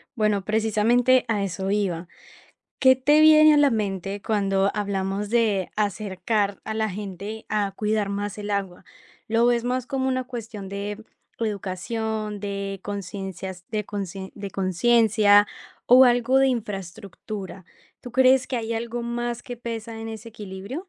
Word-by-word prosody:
Bueno, 210 -4 +1
precisamente 225 +4 +3
a 210 -3 0
eso 190 0 -3
iba. 185 -4 -1 0.7
¿Qué 260 -1 +6
te 290 +4 +4
viene 310 0 +8
a - - +4
la 290 -1 +5
mente 200 -3 -2
cuando 195 -2 +1
hablamos 200 0 -2
de 215 -6 +1
acercar 205 0 -1
a 220 - -4
la 220 0 0
gente 205 +2 -6
a 205 -2 0
cuidar 210 0 -1
más 205 0 -4
el 210 0 -5
agua? 195 -3 -3 0.4
¿Lo 225 +1 +2
ves 240 -1 +2
más 250 0 -1
como 265 -1 -1
una 255 0 -1
cuestión 225 -5 -7
de 205 +2 -5 0.4
educación, 215 +1 -3
de 200 -1 -4
conciencias 190 -2 -6
de 210 -1 -2
concien 195 -2 -6
de 200 -1 -7
conciencia 205 +2 +4 0.4
o 255 +2 +8
algo 245 +1 +3
de 270 - +5
infraestructura? 195 -3 -6 0.4
¿Tú 245 - -9
crees 260 0 +5
que 260 - -3
hay 230 -1 -3
algo 235 +1 -3
más 240 0 -3
que 245 - -7
pesa 230 -1 -6
en 225 - -6
ese 225 +1 -8
equilibrio? 210 - -7
210 Hz, 150 wpm, -24 LUFS, 195-235 Hz, 0.7 s, viene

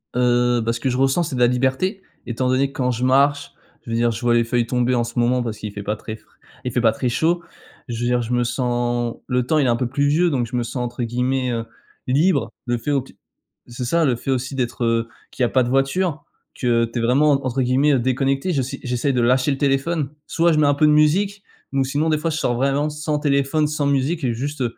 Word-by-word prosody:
Heu, 120 -1 +2
bah 115 +1 0
ce 120 - -5
que 130 - -1
je 125 - -1
ressens, 135 +6 +2
c'est 150 -5 -4
de - - -3
la 120 - +6
liberté 130 - 0 0.2
étant 125 +1 -2
donné 135 +2 +2
que - - -21
quand 125 -1 +1
je 125 +1 -3
marche, 140 +2 +2 0.3
je - - -9
veux - - 0
dire, 120 0 +2
je 115 +2 -6
vois 120 -1 +2
les 120 0 +4
feuilles 120 0 0
tomber 125 0 +1
en 120 - +1
ce 115 +1 -7
moment 125 +1 +2
parce 110 -2 -4
qu'il 105 -1 -6
fait 100 0 -7
pas 105 +2 -2
très 110 0 -7
fr - - -20 0.4
il 125 - -3
fait 120 - 0
pas 115 -2 +4
très 125 +2 -2
chaud, 170 +7 0 0.4
je 120 -2 -5
veux 120 - 0
dire, 125 0 +1
je 120 +1 -3
me 120 - +2
sens 120 -1 -1
le 125 -1 0
temps 155 +4 +2
il 140 - +2
est 125 - +2
un 120 - +3
peu 125 +1 -1
pluvieux 145 +7 +2
donc 125 -6 -1
je - - -5
me 120 - 0
sens 120 - -6
entre 120 0 -4
guillemets, 125 +2 -1
heu, 115 -1 -3 0.4
«libre» 155 +9 +2
le 120 -1 0
fait 145 +6 -3
au 140 - +2
t 130 - -16 0.5
c'est 120 +1 -6
ça, 165 +6 +2
le 130 - +2
fait 135 +3 -4
aussi, 135 +1 -2
d'être, 120 -1 -2
heu, 115 0 +1 0.2
qu'il 130 - -3
y - - +5
a - - 0
pas 130 - +3
de - - -3
voiture, 145 +4 0 0.3
que 120 -2 +1
tu 115 +1 -5
es - - -1
vraiment 135 +6 +3
en - - +5
entre 130 +1 -1
guillemets 130 +2 +3
«déconnecté», 135 +6 0
j'essai 135 -1 -2
j'essaye 125 +2 0
de 125 - +1
lâcher 130 +4 +2
le 135 - -1
téléphone, 140 +2 0 0.2
soit 170 0 +2
je - - +1
mets 150 - +4
un 145 - +4
peu 150 +2 +3
de 150 - +5
musique 195 +7 +2 0.3
ou 135 -1 +2
sinon, 145 +4 -1
des 155 - +2
fois, 160 +2 -2
je 155 - -2
sors 120 -5 0
vraiment 140 +4 +1
sans 150 0 -2
téléphone 145 +1 +1
sans 150 -1 -2
musique 140 +4 0
et 120 -3 +1
juste 140 +3 -3
130 Hz, 265 wpm, -21 LUFS, 120-145 Hz, 0.5 s, la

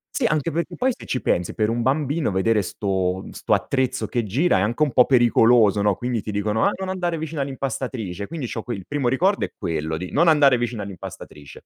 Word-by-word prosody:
Sì, 270 - 0
anche 155 - +1
perché 170 +2 -3
poi 260 +1 +1
se - - -11
ci 125 - -2
pensi 90 -1 0
per 110 -1 0
un 120 +1 -1
bambino 145 +1 0
vedere 105 +3 +2
'sto 95 -1 -2
mhmm, - - -10
'sto - - -1
attrezzo 130 -2 0
che 120 - -1
gira 130 - +1
è - - +1
anche 115 +8 -1
un 145 - +1
po' 125 - +5
pericoloso 115 -4 +4
no, 100 -1 +2
quindi 120 0 -2
ti 105 - -4
dicono: 105 +2 0
"Ah - - +3
non 190 -1 -4
andare 175 -3 -2
vicino 160 -1 -4
all'impastatrice." 130 -8 -4
Quindi 155 -6 -5
c'ho 115 -1 -5
qui 120 - -4
il 95 - -11
primo 140 -4 0
ricordo 185 +10 +1
è - - -11
quello 80 -1 -3
di 90 +2 -6
non 170 +4 +3
andare 145 -5 +5
vicino 120 -2 -3
all'impastatrice 90 -6 -10
120 Hz, 225 wpm, -22 LUFS, 100-145 Hz, -, po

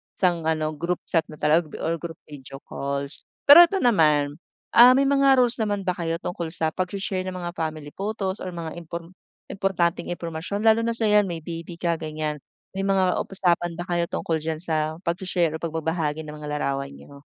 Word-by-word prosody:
isang 175 -4 +1
ano, 155 -1 0
group 170 +3 -3
chat 165 -2 +2
na 155 - -10
talaga 155 +1 +1
or 165 0 -1
group 165 0 -6
video 135 -2 -11
calls. 140 0 -3 0.2
Pero 340 +5 +10
ito 390 +2 -2
naman, 150 -9 +3 0.3
ah, 245 +2 +8
may 275 - +4
mga 275 -1 +4
rules 240 0 -2
naman 205 -2 -1
ba 185 - +1
kayo 170 -2 -2
tungkol 175 -2 -3
sa 160 -2 0
pag-she-share 185 +1 -3
ng 185 - -4
mga 175 -1 -4
family 155 -3 -5
photos 195 0 -3
or - - -6
mga 170 0 -6
impor 170 +1 -8 0.3
importanteng 190 -3 -1
impormasyon 175 +4 -4
lalo 220 0 +5
na 230 - 0
sa 230 -1 -1
'yan 210 -2 +4
may 170 - -3
baby 165 +1 -7
ka 170 0 0
ganiyan, 155 -1 -4 0.3
may 195 - -3
mga 195 -2 +2 0.2
usapan 175 -3 0
ba 175 - -4
kayo 175 -1 -1
tungkol 160 -2 -2
diyan 160 0 -2
sa 155 -1 -2
pag-she-share 175 -1 0
o 160 - -5
pagbabahagi 160 -1 -2
ng 150 - -8
mga 150 -1 -7
larawan 140 -1 -2
niyo? 140 0 -14
170 Hz, 190 wpm, -24 LUFS, 155-190 Hz, 0.3 s, Pero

